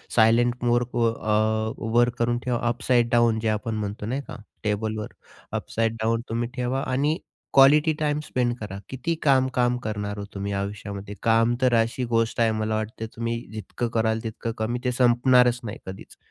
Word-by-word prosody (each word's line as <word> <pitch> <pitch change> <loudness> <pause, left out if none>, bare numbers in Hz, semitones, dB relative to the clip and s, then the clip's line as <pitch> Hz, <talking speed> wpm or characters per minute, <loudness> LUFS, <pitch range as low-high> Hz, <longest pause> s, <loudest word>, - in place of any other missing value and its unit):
Silent 120 +2 +4
मोडवर 120 -1 +2
अ, 110 0 0 0.2
वर 120 +1 +5
करून 120 0 +1
ठेवा. 125 -1 -1
अपसाइड 120 0 +2
डाउन 120 -2 +3
जे 110 - -2
आपण 110 +1 -2
म्हणतो, 105 0 -4
नाही 130 +6 -2
का, - - -7 0.3
टेबलवर. 105 0 -2 0.4
अपसाइड 115 0 -1
डाउन 115 +1 +1
तुम्ही 115 +1 -2
ठेवा 125 +1 -1
आणि 145 +5 +1 0.4
क्वालिटी 150 +3 +6
टाइम 150 -1 0
स्पेंड 125 -5 -1
करा. 105 -2 -6
किती 130 +6 -2
काम-काम 130 -3 +3
करणार 105 -1 -3
हो 100 - -4
तुम्ही 100 0 -3
आयुष्यामध्ये? 100 0 -5
काम 115 +1 +3
तर 130 -1 +3
अशी 115 +3 -2
गोष्ट 115 -1 0
आहे, 115 -1 +4
मला 110 0 -1
वाटतं, 110 +1 -4
तुम्ही 115 0 -2
जितकं 110 +3 -4
कराल 110 -1 +1
तितकं 115 0 -4
कमी, 115 +3 -1
ते 125 - +1
संपणारच 125 0 +4
नाही 105 -3 -5
कधीच. 95 +1 -10
115 Hz, 165 wpm, -25 LUFS, 110-125 Hz, 0.4 s, क्वालिटी